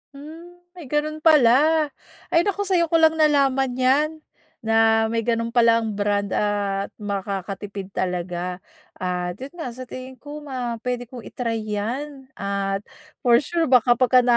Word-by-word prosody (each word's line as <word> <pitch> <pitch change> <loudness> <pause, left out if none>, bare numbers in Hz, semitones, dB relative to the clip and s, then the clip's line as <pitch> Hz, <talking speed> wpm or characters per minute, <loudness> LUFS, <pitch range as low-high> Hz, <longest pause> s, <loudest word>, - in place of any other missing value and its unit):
Hmm, 335 +5 -12
may 350 -6 -11
gano'n 300 +2 -1
pala. 305 +1 +5 0.4
Ay 330 - +5
naku, 405 0 0
sa'yo 360 -4 +2
ko 330 - 0
lang 320 -1 +4
nalaman 270 -4 +3
'yan, 265 +4 +3 0.5
na 225 0 +3
may 230 - 0
gano'n 230 0 -1
palang 230 -2 +3
brand 205 -1 0
at 200 -1 -1
makakatipid 200 -1 -5
talaga. 180 0 -3 0.3
At 180 -1 -3
'yon 265 +5 -9
nga, 315 - -3
sa 255 - -7
tingin 255 +1 -9
ko, 290 +3 -9
ma 250 -5 -4
puwede 245 0 -3
kong 245 -4 -9
i-try 230 -2 -3
'yan, 260 +6 -4
at 200 0 -2 0.3
for 240 -1 +4
sure 335 -2 0
baka 245 -1 +4
kapag 255 0 +5
245 Hz, 145 wpm, -23 LUFS, 205-290 Hz, 0.5 s, pala